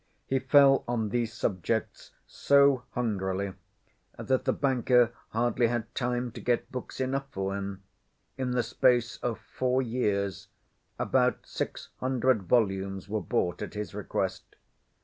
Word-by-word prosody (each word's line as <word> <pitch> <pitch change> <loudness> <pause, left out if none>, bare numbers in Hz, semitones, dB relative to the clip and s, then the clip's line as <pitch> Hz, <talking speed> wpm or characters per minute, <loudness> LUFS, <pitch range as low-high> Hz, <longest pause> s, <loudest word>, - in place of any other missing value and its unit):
He 135 - +1
fell 135 +1 +5
on 115 -3 -1
these 115 0 -1
subjects 110 0 -2 0.2
so 140 -3 +3
hungrily 100 -4 -1 0.6
that 130 -1 0
the - - +3
banker 125 -3 +3 0.2
hardly 120 +1 +1
had 120 0 -3
time 125 -1 -1
to - - -9
get 120 -1 0
books 125 0 -6
enough 135 +1 -1
for 95 -3 -3
him. 100 -1 -5 0.5
In 130 -1 -2
the 125 -1 +1
space 120 0 +2
of 120 -2 -2
four 130 0 -1
years 105 -7 -1 0.5
about - - +1
six - - -5
hundred 130 -3 +2
volumes 95 -4 +1
were 105 +1 -2
bought 90 -7 -1
at - - -6
his 105 -3 -4
request. - - -3
120 Hz, 135 wpm, -28 LUFS, 105-130 Hz, 0.6 s, fell